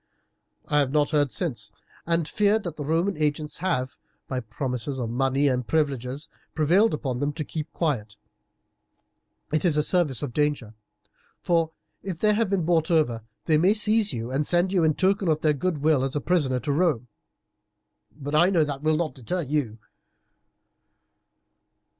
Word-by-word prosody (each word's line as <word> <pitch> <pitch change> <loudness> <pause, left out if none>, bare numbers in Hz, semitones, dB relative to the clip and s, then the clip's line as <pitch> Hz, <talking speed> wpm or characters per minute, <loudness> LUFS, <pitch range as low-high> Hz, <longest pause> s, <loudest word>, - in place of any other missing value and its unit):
I 150 - +3
have 140 -3 +2
not 145 +2 +1
heard 145 -4 +2
since, 120 - -3 0.4
and 165 -2 +1
fear 210 +3 +2
that 175 -7 -6
the 150 - -5
Roman 165 +6 0
agents 150 0 -1
have, 130 -8 -2 0.3
by 130 - -2
promises 125 +3 -4
of 120 -3 -3
money 135 +3 +1
and 125 -3 0
privileges, 140 0 -1 0.3
prevailed 175 +7 +3
upon 130 -5 -3
them 145 +2 0
to 155 +1 -4
keep 155 +1 -6
quiet. 115 - -2 1.4
It 155 - +1
is 165 -4 +2
a 150 - +3
service 150 - +1
of 130 -5 -4
danger; 145 -7 -1 0.7
for 165 -2 +1 0.3
if 190 -4 -5
they 210 +4 +3
have 220 -1 +1
been 190 -4 0
bought 165 -2 +2
over 150 -9 +2 0.2
they 155 -1 +3
may 190 +6 +4
seize 215 0 +3
you 115 +1 -5
and 135 +3 +1
send 175 +2 +2
you 180 -3 +3
in 155 -2 +3
token 195 0 +1
of 155 -1 +1
their 155 -1 +3
goodwill 150 -2 +1
as 135 +1 -2
a - - +1
prisoner 145 -6 +1
to 150 - -2
Rome; 145 -6 +1 1.1
but 145 0 -6
I 170 +4 +5
know 170 -5 +3
that 145 -2 -4
will 155 0 +2
not 165 -2 -1
deter 165 +7 -3
you." 135 -6 -2
150 Hz, 170 wpm, -25 LUFS, 135-170 Hz, 1.4 s, I